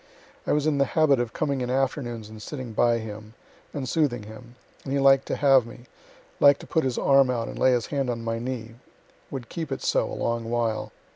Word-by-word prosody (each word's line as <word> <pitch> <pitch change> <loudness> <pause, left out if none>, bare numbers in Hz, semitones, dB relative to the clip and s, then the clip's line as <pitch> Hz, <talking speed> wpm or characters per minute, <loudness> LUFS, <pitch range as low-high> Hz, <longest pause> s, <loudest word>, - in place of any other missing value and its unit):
I - - +1
was 150 0 +1
in 150 -2 +1
the 140 - +4
habit 150 -5 +4
of 120 -2 -2
coming 140 -1 -1
in 125 - -2
afternoons 125 -4 -2
and 110 0 -11
sitting 130 -1 -7
by 120 +2 +3
him, 110 0 -8 0.4
and 135 -3 -4
soothing 125 -6 0
him, 110 +3 -12 0.3
and 135 - -6
he - - +2
liked 135 -1 +4
to - - -1
have 135 -4 +4
me 120 +1 -12 0.6
liked 140 -1 +6
to - - -10
put 160 - 0
his 130 -2 -1
arm 135 -1 +4
out 120 -2 -1
and - - -7
lay 130 - +4
his 120 -2 0
hand 135 -3 0
on 115 -1 -3
my 115 0 -2
knee 115 -2 -5 0.6
would 130 -4 -6
keep 160 0 -5
it 135 - -4
so - - +1
a - - -4
long 115 0 -2
while. 110 -2 -1
125 Hz, 225 wpm, -25 LUFS, 115-140 Hz, 0.6 s, liked